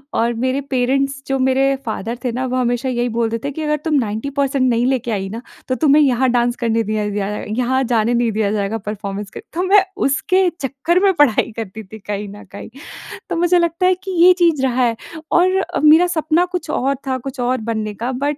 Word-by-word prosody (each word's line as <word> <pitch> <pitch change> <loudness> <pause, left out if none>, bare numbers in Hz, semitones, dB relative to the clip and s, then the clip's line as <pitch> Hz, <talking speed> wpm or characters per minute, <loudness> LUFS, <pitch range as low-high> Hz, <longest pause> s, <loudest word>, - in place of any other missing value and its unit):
और 235 +1 +1
मेरे 260 +2 0
पेरेंट्स 275 +2 0
जो 270 0 -1
मेरे 265 +1 +2
फादर 225 +1 -4
थे 245 - 0
ना 255 +2 -2
वो 255 0 -2
हमेशा 245 0 0
यही 245 -1 -1
बोलते 230 0 0
थे, 285 - -2
"कि 315 +3 -6
अगर 300 0 0
तुम 320 - 0
90% 260 +4 -1
नहीं 235 0 +1
लेके 250 -3 0
आई 195 -2 -2
ना, 225 +4 -6 0.3
तो 255 - 0
तुम्हें 290 +3 +4
यहाँ 260 -2 +2
डांस 240 0 +1
करने 230 0 +1
दिया 215 0 -2
ज - - -5
जाए, 205 0 -3
यहाँ 260 +1 +1
जाने 235 -1 +1
नहीं 235 -1 +1
दिया 210 -1 0
जाएगा 210 +1 -1
परफॉर्मेंस 205 -1 -5
के।" - - -8
तो 350 +2 -1
मैं 390 +1 +5 0.2
उसके 370 +7 +2
चक्कर 275 +7 0
में 390 -1 +4
पढ़ाई 290 - +2
करती 220 -1 -6
थी 215 +3 -12
कहीं 205 +1 -5
न 205 - -12
कहीं। 200 - -9 0.6
तो - - -1
मुझे 350 +1 +3
लगता 340 +1 0
है 370 0 +4
कि 385 - -5
ये 365 - +8
चीज़ 315 -5 +3
रहा 255 -1 +1
है 235 -2 +1 0.4
और 370 +2 +3 0.2
मेरा 315 +4 +6
सपना 330 0 +1
कुछ 360 -2 -5
और 275 -3 0
था, 260 -1 0
कुछ 270 +1 -8
और 250 +1 +1
बनने 215 -2 -3
का 250 - -1
बट 290 0 -1
255 Hz, 220 wpm, -18 LUFS, 225-295 Hz, 0.6 s, ये